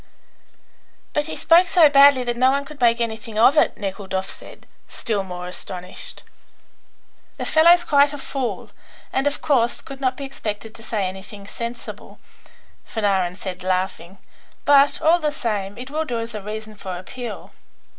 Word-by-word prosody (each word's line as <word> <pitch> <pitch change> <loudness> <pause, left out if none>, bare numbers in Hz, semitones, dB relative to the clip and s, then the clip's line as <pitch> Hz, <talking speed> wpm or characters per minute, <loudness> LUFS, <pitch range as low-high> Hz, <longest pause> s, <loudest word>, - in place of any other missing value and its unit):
"But 295 +1 0
he - - -5
spoke 345 +2 +5
so 345 -4 +6
badly 280 -2 +6
that 240 -1 -2
no 255 +2 +4
one 280 +1 0
could 290 -1 -12
make 235 -1 +4
anything 225 -1 -4
of 240 +6 +6
it," - - +3
Nekhludoff 190 -1 -4
said, - - -10 0.2
still 215 -3 -2
more 180 -2 -7
astonished. 180 0 -6 1.1
"The - - -4
fellow's 340 +2 +6
quite 285 -3 +4
a 290 - -6
fool, 270 -2 -4 0.4
and 270 +2 +1
of 290 - -2
course 240 -6 +2
could 275 0 -10
not 255 -1 0
be 280 - -5
expected 220 -4 -6
to 225 - -12
say 215 -3 -2
anything 195 +2 -9
sensible," 235 +3 -7 0.7
Fanarin 195 -5 0
said, 185 -1 -6
laughing; 185 0 -2 0.5
"but, 285 0 +5
all 335 +3 +5
the 305 -2 0
same, 210 -7 -3
it 255 +3 -8
will 315 +2 -1
do 240 -5 -3
as 230 0 -5
a 210 - -5
reason 215 +1 -7
for 190 -3 -6
appeal. 240 +6 -8
235 Hz, 165 wpm, -22 LUFS, 195-280 Hz, 1.1 s, so